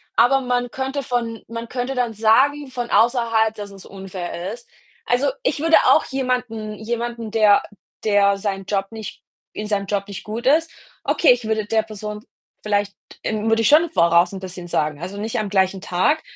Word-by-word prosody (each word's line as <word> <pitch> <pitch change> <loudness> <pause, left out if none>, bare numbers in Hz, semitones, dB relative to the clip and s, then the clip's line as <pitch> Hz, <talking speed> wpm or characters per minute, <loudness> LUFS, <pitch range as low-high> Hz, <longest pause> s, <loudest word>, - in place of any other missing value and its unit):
aber 265 +3 +4
man 245 -1 -1
könnte 270 +1 -3
von 230 -2 -3
man 230 0 -6
könnte 255 +1 -3
dann 240 -3 0
sagen 265 +7 +3
von 245 -1 -4
außerhalb, 230 -2 +3
dass 205 -1 -7
es 195 -2 -12
unfair 190 0 -6
ist. 235 0 -12 0.4
Also, 255 +3 +2
ich 285 - 0
würde 325 +1 +5
auch - - +5
jemanden 250 -5 -2
jemanden, 235 0 -4
der 215 -2 +5 0.4
der 200 -2 +3
sein 195 -1 -3
Job 195 -1 -1
nicht 220 -2 -8 0.3
in 210 0 -5
seinem 200 -2 -1
Job 200 -1 -2
nicht 200 - -7
gut 225 +3 -6
ist 320 +4 +3 0.3
okay, 315 - +4
ich 245 -2 +1
würde 220 -1 0
der 220 +1 +2
Person 210 0 -7 0.4
vielleicht, 205 -1 0 0.3
ähm 220 0 -1
würde 225 0 +3
ich - - +4
schon 320 +3 +5
voraus 170 - +4
'n 190 - -5
bisschen 180 -2 -8
sagen. 150 -2 -1
Also, 190 +3 -6
nicht 220 +2 -2
am 210 -2 -2
gleichen 190 -1 +1
Tag. 295 - +1
220 Hz, 185 wpm, -21 LUFS, 200-245 Hz, 0.4 s, würde